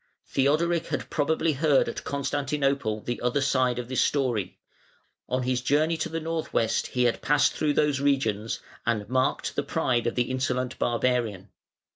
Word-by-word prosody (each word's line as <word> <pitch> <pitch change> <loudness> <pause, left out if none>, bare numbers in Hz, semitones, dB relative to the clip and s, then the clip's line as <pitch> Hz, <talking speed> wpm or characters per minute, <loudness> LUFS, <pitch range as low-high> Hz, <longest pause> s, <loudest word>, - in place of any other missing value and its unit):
Theodoric 160 +5 +1
had - - -4
probably 160 +1 +1
heard 145 0 +3
at - - -5
Constantinople 140 -5 -1
the 120 +2 -4
other 125 +3 +1
side 130 -3 +1
of 125 -1 -4
this 130 0 0
story: 125 -9 0 0.7
on 130 0 0
his 125 0 0
journey 150 +5 +2
to 160 - -2
the 165 +1 -3
north 165 0 -3
west 115 -1 +1
he 125 - 0
had 120 -1 +1
passed 150 +1 +3
through 150 -1 0
those 145 -2 +2
regions, 115 -7 0 0.2
and 110 -3 -1
marked 130 +2 0
the - - +1
pride 120 -2 0
of 120 - -1
the 125 0 0
insolent 130 -1 -2
barbarian. 115 -5 0
130 Hz, 165 wpm, -26 LUFS, 120-145 Hz, 0.7 s, heard